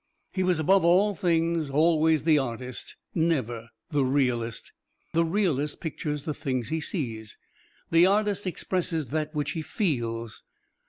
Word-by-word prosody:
He 190 Hz, -, -1 dB
was 180 Hz, -2 st, +2 dB
above 190 Hz, +5 st, +4 dB
all 190 Hz, +5 st, +4 dB
things 165 Hz, -3 st, +1 dB
always 160 Hz, +1 st, +3 dB
the 155 Hz, -2 st, +4 dB
artist, 125 Hz, -1 st, -5 dB, 0.2 s
never 130 Hz, -, 0 dB, 0.2 s
the 145 Hz, -2 st, +2 dB
realist. 125 Hz, -4 st, 0 dB, 0.4 s
The 165 Hz, -, +3 dB
realist 165 Hz, -5 st, 0 dB
pictures 150 Hz, -2 st, -4 dB
the 155 Hz, -, -2 dB
things 130 Hz, -5 st, -3 dB
he 160 Hz, 0 st, -1 dB
sees; 115 Hz, -, -4 dB, 0.5 s
the 165 Hz, +2 st, +6 dB
artist 205 Hz, 0 st, +1 dB
expresses 170 Hz, -5 st, -2 dB
that 155 Hz, +1 st, -2 dB
which 150 Hz, -1 st, -1 dB
he 165 Hz, -, -3 dB
feels. 115 Hz, -, -2 dB
155 Hz, 140 wpm, -27 LUFS, 130-170 Hz, 0.5 s, the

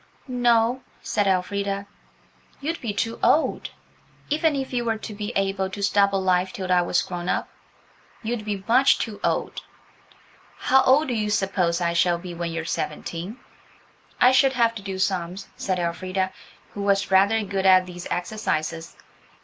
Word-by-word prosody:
"No," 245 Hz, 0 st, +2 dB, 0.2 s
said 205 Hz, -2 st, 0 dB
Elfrida; 200 Hz, +1 st, -1 dB, 0.7 s
"you'd 320 Hz, +4 st, -3 dB
be 230 Hz, -, -2 dB
too 225 Hz, +3 st, -2 dB
old–even 310 Hz, 0 st, -1 dB
if 270 Hz, -1 st, -4 dB
you 240 Hz, -1 st, 0 dB
were 225 Hz, -1 st, 0 dB
to 215 Hz, -, -8 dB
be 205 Hz, +2 st, -4 dB
able 195 Hz, -1 st, 0 dB
to 200 Hz, +2 st, -6 dB
stop 200 Hz, 0 st, +3 dB
alive 185 Hz, -1 st, +1 dB
till 185 Hz, -2 st, -4 dB
I 180 Hz, -1 st, +5 dB
was 175 Hz, 0 st, +1 dB
grown 175 Hz, -1 st, -5 dB
up, -, -, 0 dB, 0.8 s
you'd 225 Hz, 0 st, -3 dB
be 205 Hz, -2 st, -4 dB
much 255 Hz, +4 st, +5 dB
too 215 Hz, -3 st, -4 dB
old." -, -, -1 dB, 1.0 s
"How 265 Hz, 0 st, +4 dB
old 275 Hz, +3 st, +4 dB
do -, -, 0 dB
you 215 Hz, -2 st, -1 dB
suppose 185 Hz, -4 st, 0 dB
I 170 Hz, -1 st, +1 dB
shall 170 Hz, 0 st, +3 dB
be 175 Hz, 0 st, -8 dB
when 170 Hz, 0 st, -4 dB
you're 165 Hz, -1 st, -4 dB
seventeen?" 175 Hz, +5 st, -4 dB, 0.8 s
"I 250 Hz, -, +7 dB
should 265 Hz, +1 st, +4 dB
have 235 Hz, -2 st, +2 dB
to 225 Hz, -, -7 dB
do 195 Hz, -1 st, -5 dB
sums," 190 Hz, 0 st, -2 dB
said 185 Hz, -1 st, -2 dB
Elfrida, 185 Hz, +2 st, -2 dB, 0.4 s
who 205 Hz, -, -5 dB
was 200 Hz, -1 st, +1 dB
rather 200 Hz, +4 st, +4 dB
good 195 Hz, -1 st, -1 dB
at 185 Hz, -1 st, +6 dB
these 175 Hz, -1 st, -8 dB
exercises. 170 Hz, -4 st, -3 dB
200 Hz, 160 wpm, -24 LUFS, 185-225 Hz, 1.0 s, I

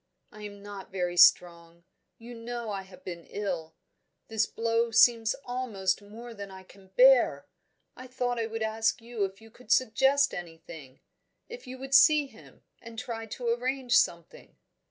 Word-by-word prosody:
I 215 Hz, -, -13 dB
am 205 Hz, -1 st, -10 dB
not 200 Hz, -2 st, -10 dB
very 180 Hz, -2 st, -2 dB
strong; 170 Hz, -1 st, +3 dB, 0.3 s
you 235 Hz, +1 st, -11 dB
know 235 Hz, -1 st, -6 dB
I 195 Hz, -1 st, -4 dB
have 185 Hz, -1 st, -16 dB
been 170 Hz, -2 st, -8 dB
ill: 175 Hz, -6 st, -5 dB, 0.5 s
this 220 Hz, -1 st, 0 dB
blow 230 Hz, +1 st, 0 dB
seems 225 Hz, -1 st, +4 dB
almost 215 Hz, -7 st, -2 dB
more 230 Hz, +4 st, -11 dB
than 200 Hz, -2 st, -9 dB
I 190 Hz, 0 st, -12 dB
can 190 Hz, +1 st, -19 dB
bear; 250 Hz, -, +5 dB, 0.5 s
I 255 Hz, +1 st, -11 dB
thought 245 Hz, -1 st, -2 dB
I 225 Hz, -, -1 dB
would 225 Hz, 0 st, -4 dB
ask 220 Hz, +1 st, 0 dB
you 230 Hz, -3 st, -3 dB
if 195 Hz, +2 st, -9 dB
you 225 Hz, 0 st, -16 dB
could 250 Hz, -, -12 dB
suggest 270 Hz, +4 st, +3 dB
anything 165 Hz, -5 st, -10 dB, 0.5 s
if 475 Hz, -, -10 dB
you 255 Hz, +1 st, -8 dB
would 270 Hz, +1 st, -8 dB
see 295 Hz, +2 st, +6 dB
him, 275 Hz, -, -18 dB, 0.2 s
and 230 Hz, -1 st, -12 dB
try 225 Hz, -2 st, -6 dB
to 235 Hz, +2 st, -4 dB
arrange 250 Hz, +1 st, -1 dB
something." 170 Hz, -1 st, -1 dB
225 Hz, 165 wpm, -28 LUFS, 190-245 Hz, 0.5 s, see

